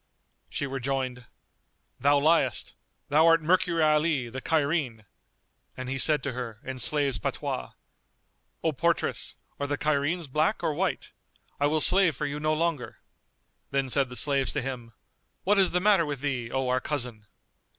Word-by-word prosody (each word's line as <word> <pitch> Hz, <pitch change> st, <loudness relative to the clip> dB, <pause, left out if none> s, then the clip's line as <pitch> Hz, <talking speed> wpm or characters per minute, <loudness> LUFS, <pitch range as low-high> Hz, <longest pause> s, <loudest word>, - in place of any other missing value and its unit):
She -, -, -3 dB
rejoined, 130 Hz, -2 st, -3 dB, 0.7 s
"Thou 145 Hz, +3 st, +4 dB
liest, 160 Hz, +4 st, +2 dB, 0.4 s
thou 155 Hz, +3 st, +5 dB
art 165 Hz, -1 st, +5 dB
Mercury 175 Hz, -1 st, +2 dB
Ali 150 Hz, -4 st, +2 dB
the 130 Hz, +3 st, -6 dB
Cairene." 145 Hz, -8 st, 0 dB, 0.7 s
And 130 Hz, 0 st, -5 dB
he 135 Hz, +1 st, -2 dB
said 150 Hz, 0 st, +3 dB
to 140 Hz, -, -2 dB
her, 120 Hz, -3 st, -6 dB
in 130 Hz, -1 st, -6 dB
slaves' 140 Hz, 0 st, +1 dB
patois, 60 Hz, -1 st, -4 dB, 0.9 s
"O 160 Hz, -, +2 dB
portress, 170 Hz, +4 st, 0 dB, 0.2 s
are 140 Hz, -, -2 dB
the 145 Hz, 0 st, -2 dB
Cairenes 155 Hz, +3 st, 0 dB
black 155 Hz, +9 st, 0 dB
or 155 Hz, -, +1 dB
white? 185 Hz, +5 st, -2 dB, 0.5 s
I 145 Hz, -, +3 dB
will 155 Hz, +1 st, +1 dB
slave 180 Hz, -4 st, +5 dB
for 150 Hz, -, -3 dB
you 145 Hz, 0 st, -4 dB
no 155 Hz, +1 st, +1 dB
longer." 160 Hz, -5 st, -2 dB, 0.7 s
Then 135 Hz, -1 st, -1 dB
said 135 Hz, -1 st, +2 dB
the 125 Hz, -, -8 dB
slaves 135 Hz, +2 st, +2 dB
to 145 Hz, -, -2 dB
him, 120 Hz, -3 st, -6 dB, 0.5 s
"What 200 Hz, +1 st, +3 dB
is 190 Hz, -, +5 dB
the 180 Hz, -, 0 dB
matter 190 Hz, -4 st, +3 dB
with 145 Hz, -3 st, -4 dB
thee, 130 Hz, -5 st, -2 dB
O 135 Hz, +1 st, -1 dB
our 125 Hz, 0 st, +1 dB
cousin?" 125 Hz, -8 st, -4 dB
145 Hz, 160 wpm, -27 LUFS, 130-160 Hz, 0.9 s, thou